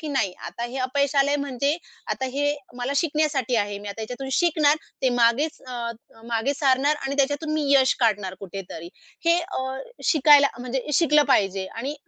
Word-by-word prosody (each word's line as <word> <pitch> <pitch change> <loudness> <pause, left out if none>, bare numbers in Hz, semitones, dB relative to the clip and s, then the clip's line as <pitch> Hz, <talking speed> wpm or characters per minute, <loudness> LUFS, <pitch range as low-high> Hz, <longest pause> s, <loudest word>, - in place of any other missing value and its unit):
की 310 - -6
नाही 265 -10 0
आता 235 - -5
हे 240 +2 -6
अपयशालय 280 +2 +1
म्हणजे 280 0 -1 0.4
आता 265 - -3
हे 290 +1 +1 0.2
मला 245 +3 -2
शिकण्यासाठी 300 -6 +1
आहे. 205 -1 -1
मी 205 - -8
आता 200 +3 -7
ह्याच्यातून 250 +4 -6
शिकणार 310 -4 +3 0.3
ते 260 - +4
मागेच 240 +7 +2
अ, 235 -2 -4 0.3
मागे 235 +4 0
सारणार 275 +1 +2
आणि 270 +1 -3
त्याच्यातून 290 +3 0
मी 300 -2 -1
यश 265 -1 +5
काढणार 205 -5 +1
कुठेतरी. 180 -3 -8 0.4
हे 335 +1 +5
अ, 265 -7 -4 0.3
शिकायला 290 -2 +6
म्हणजे 250 +1 -3
शिकलं 300 -1 +4
पाहिजे 195 -4 +1
आणि 260 +9 -5
270 Hz, 165 wpm, -24 LUFS, 235-290 Hz, 0.4 s, शिकायला